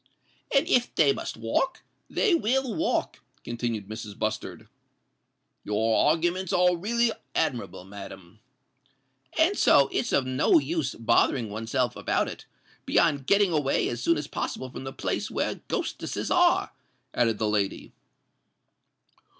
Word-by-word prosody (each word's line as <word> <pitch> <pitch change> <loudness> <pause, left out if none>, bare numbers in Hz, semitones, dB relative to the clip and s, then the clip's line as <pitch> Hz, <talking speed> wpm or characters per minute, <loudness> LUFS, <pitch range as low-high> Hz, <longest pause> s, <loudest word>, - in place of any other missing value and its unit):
"And 275 - +4
if 245 -1 +2
they 145 -3 +4
must - - -6
walk, 115 - -1 0.3
they 425 -6 +2
will 265 -4 +1
walk," 325 +1 -1 0.2
continued 115 -4 -3
Mrs. 110 -1 -7
Bustard. 110 0 -4 1.0
"Your 110 +2 +1
arguments 175 +4 +1
are 180 0 +4
really 230 +6 +1 0.2
admirable, 125 - -2
madam." 95 0 -11 1.0
"And 340 +6 +4
so 140 - +5
it's - - -1
of 135 - +2
no 130 - +3
use 325 +1 -1
bothering 115 0 +2
oneself 115 +4 -1
about - - 0
it—beyond 145 -5 -2
getting 200 -2 +4
away 145 -3 +1
as 120 0 -4
soon 165 +6 +2
as 150 - -3
possible 130 -2 -4
from 135 - -8
the 135 - -5
place - - -3
where - - -2
ghostesses - - -3
are," - - +3 0.4
added 115 -3 +1
the 110 - 0
lady. 105 -2 -1
135 Hz, 130 wpm, -27 LUFS, 110-190 Hz, 1.0 s, so